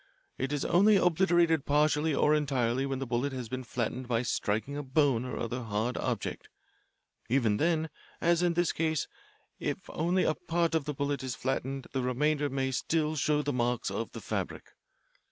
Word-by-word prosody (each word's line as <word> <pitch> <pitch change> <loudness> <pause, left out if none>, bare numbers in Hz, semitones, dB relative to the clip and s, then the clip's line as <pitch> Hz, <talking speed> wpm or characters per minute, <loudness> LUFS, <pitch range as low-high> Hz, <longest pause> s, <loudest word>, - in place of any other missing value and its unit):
It 130 +2 -1
is 145 -1 -1
only 205 +4 +5
obliterated 175 -3 +3
partially 150 +1 +2
or 150 - +4
entirely 135 -3 +1
when 135 -1 -2
the 135 - -3
bullet 125 +3 -1
has 125 -3 -4
been 130 0 -4
flattened 125 +1 -3
by 120 0 +1
striking 110 +3 -1
a 145 - -2
bone 135 -3 +2
or 125 - -4
other 120 +2 -3
hard 110 +2 -2
object. - - -3 0.8
Even 115 -5 +2
then, 160 +1 +1 0.3
as 170 0 +3
in 175 -1 +2
this 175 -1 +2
case, 160 -2 0 0.5
if - - -1
only 175 +3 +1
a - - +2
part 170 +1 -1
of 160 -4 +1
the 150 -1 -3
bullet 140 0 -1
is 130 -2 -3
flattened 135 0 -2
the 135 - -1
remainder 145 +4 +1
may 135 0 -1
still 155 +3 0
show 150 0 +1
the 145 - -1
marks 120 -4 0
of 110 +3 -3
the - - -7
fabric. - - -4
140 Hz, 180 wpm, -30 LUFS, 125-155 Hz, 0.8 s, only